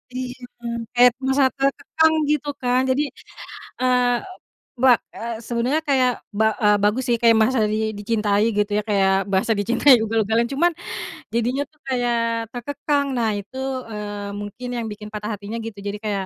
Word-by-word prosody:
Iya, 255 -1 -4 0.6
kayak 245 0 +7
merasa 265 +1 +3
terkekang, 315 +4 +2 0.2
gitu 300 -1 0
kan, 250 0 +2
jadi, 260 +3 +2 0.8
eee, 250 -1 +3 0.7
ba 260 -1 +8 0.2
eee, 230 0 -4
sebenarnya 250 +6 0
kayak 260 -2 +4 0.3
ba 220 - +4 0.2
eee, 210 0 +5
bagus 210 +5 +2
sih 235 - +3
kayak 230 -1 +5
merasa 245 +2 +3
di 215 - 0 0.2
dicintai 210 0 +1
gitu 210 0 +1
ya, - - 0
kayak 195 -2 +3 0.2
merasa 195 +4 +2
dicintai 240 +6 +5
ugal-ugalan. 225 +1 +1
Cuman 345 +6 +2 0.6
jadinya 245 +4 0
tuh 300 - -33
kayak 245 -2 0 0.4
terkekang. 285 +3 -1
Nah, 230 -2 +1
itu, 205 +6 -10 0.3
eee, 205 -1 -5
mungkin 205 +5 -7
yang 230 - -3
bikin 210 0 -8
patah 210 0 -4
hatinya 205 +3 -6
gitu 225 -3 -7
jadi 200 - -3
kayak, 200 -2 -1
235 Hz, 155 wpm, -22 LUFS, 210-260 Hz, 0.8 s, ba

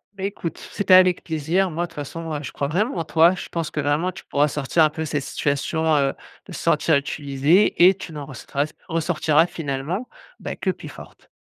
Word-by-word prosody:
Beh, 195 0 -4
écoute, 180 -4 -6
c'était 200 -2 +2
avec 185 -1 +6
plaisir. 165 +4 0
Moi, 170 +3 -2
de - - -25
toute - - -19
façon, 160 +3 -6
heu, 145 - -5
je 135 - -6
crois 140 - -2
vraiment 190 - -1
en 165 - -1
toi. 165 +2 +4
Je 185 - -7
pense 165 -2 -3
que 155 - -3
vraiment, 150 +5 0
tu 190 - -12
pourras 145 +1 +2
sortir 150 +3 +1
un 155 - +3
peu 160 +1 -4
cette 145 -2 -2
situation, 145 +3 -1
heu, 140 -1 +2 0.4
de - - -11
te - - -6
sentir 160 - +2
utilisé 145 +6 +2
et 190 - +5
tu 180 -3 -9
n'en 145 -2 -7
ressortiras 140 +2 -3 0.2
ressortiras 160 -1 +2
finalement 160 - -4 0.3
bah, - - -5
que - - -2
plus - - -4
forte. - - -14
160 Hz, 215 wpm, -22 LUFS, 145-175 Hz, 0.4 s, avec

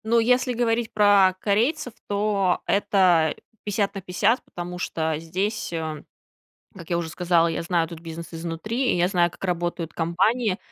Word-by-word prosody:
Ну, 230 +1 +3
если 250 +2 +2
говорить 230 -1 0
про 200 -3 +5
корейцев, 240 - 0
то 200 -3 +1
это 180 -6 +3 0.3
50 205 -1 -1
на 195 - -6
50, 200 +6 +1
потому 180 0 -7
что 160 -2 -1
здесь, 190 +7 -3
а, 155 -2 -4 0.7
как 175 -5 -12
я 170 - +1
уже 170 -1 -3
сказала, 170 0 +2
я 165 - -2
знаю 170 -1 +1
этот 165 0 -9
бизнес 165 0 -8
изнутри, 175 +10 -2
и - - 0
я 175 +1 +2
знаю, 175 -3 +2
как 175 - -15
работают 175 -2 -2
компании. 190 +6 +1
185 Hz, 160 wpm, -24 LUFS, 170-215 Hz, 0.7 s, про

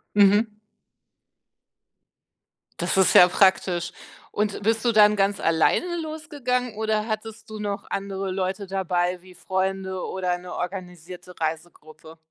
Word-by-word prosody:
Mhm. 210 +2 +4 2.2
Das - - 0
ist 185 -2 +5
ja 180 - +10
praktisch 180 -2 +2 0.4
und 210 -1 -2
bist 225 +2 +1
du 240 - +3
dann 210 -1 +6
ganz 195 0 +1
alleine 165 - +2 0.2
losgegangen 285 -7 -3
oder 215 0 -1
hattest 220 0 -5
du 215 -1 -7
noch 205 -1 -4
andere 195 -1 -3
Leute 190 +1 -3
dabei 180 -2 -1
wie 185 0 -16
Freunde 190 0 -2
oder 180 -1 -2
'ne 180 0 -9
organisierte 180 -1 -7
Reisegruppe? 160 0 -6
195 Hz, 120 wpm, -24 LUFS, 180-215 Hz, 2.2 s, ja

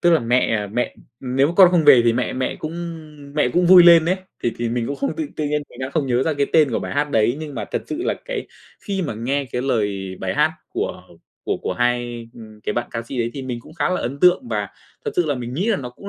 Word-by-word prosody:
tức 175 - +4
là 165 - +5
mẹ 115 -3 +1
mẹ 120 +5 -2 0.2
nếu 130 +2 +1
mà - - -2
con 185 -2 +8
không 170 -4 +3
về 140 -4 +8
thì 115 - +4
mẹ 125 +1 -1
mẹ 130 0 -2
cũng 155 +1 -6 0.6
mẹ 150 -5 +2
cũng 175 +7 +2
vui 180 0 +9
lên 170 -2 +8
ấy, 180 +3 +1 0.3
thì 120 - 0
thì 120 0 -1
mình 115 0 -1
cũng 140 - -3
không 275 - -2
tự 320 -2 -2
tự 155 - -2
nhiên 150 0 -1
mình 120 - -15
đang 130 +1 -3
không 150 -3 -1
nhớ 125 0 +1
ra 160 0 0
cái 140 0 +1
tên 155 -5 +5
của - - 0
bài - - -5
hát 145 +1 0
đấy 115 +1 +2
nhưng 150 -3 -7
mà - - -3
thật - - -1
sự 315 +3 -4
là, - - 0
cái, - - -4 0.3
khi 195 -2 -3
mà 145 -9 -3
nghe 135 +6 -1
cái 125 - -1
lời 100 -7 -1
bài - - -2
hát - - +2 0.2
của - - -3 0.4
của - - -1
của - - -1
hai 120 -1 -1 0.3
cái - - -2
bạn 120 0 -2
ca 115 - -4
sĩ 125 +3 -6
đấy, 115 0 0
thì 135 - -5
mình 125 -2 -5
cũng 155 - -15
khá 155 -4 0
là 185 - -1
ấn 135 +4 -4
tượng 180 +7 +4
và - - -2 0.4
thật 440 - -1
sự 170 - +2
là 145 - 0
mình 125 0 -6
nghĩ 185 +8 -1
là 220 - +2
nó 125 -5 -6
cũng 200 +11 -11
135 Hz, 280 wpm, -21 LUFS, 120-165 Hz, 0.6 s, vui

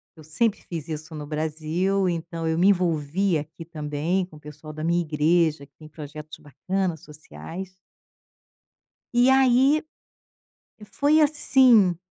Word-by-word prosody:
Eu 155 - -14
sempre 195 +8 -1
fiz 165 -2 -7
isso 155 +1 -6
no 150 -1 -6
Brasil, 160 +5 -1
então 165 -1 -4
eu 160 0 0
me 190 - +4
envolvi 175 0 +1
aqui 155 +3 -8
também, 160 +3 -2
com 160 - -17
o - - -13
pessoal 150 +1 -11
da 155 +1 -7
minha 170 +1 +1
igreja 155 -1 +1
que 140 - -32
tem 155 - -13
projetos 150 0 -10
bacana, 180 +5 -3
sociais. 155 - -10 1.4
E 250 +2 +5
aí, 265 +3 +4 1.0
foi 295 +7 +2
assim 255 - +4
165 Hz, 135 wpm, -24 LUFS, 155-190 Hz, 1.4 s, E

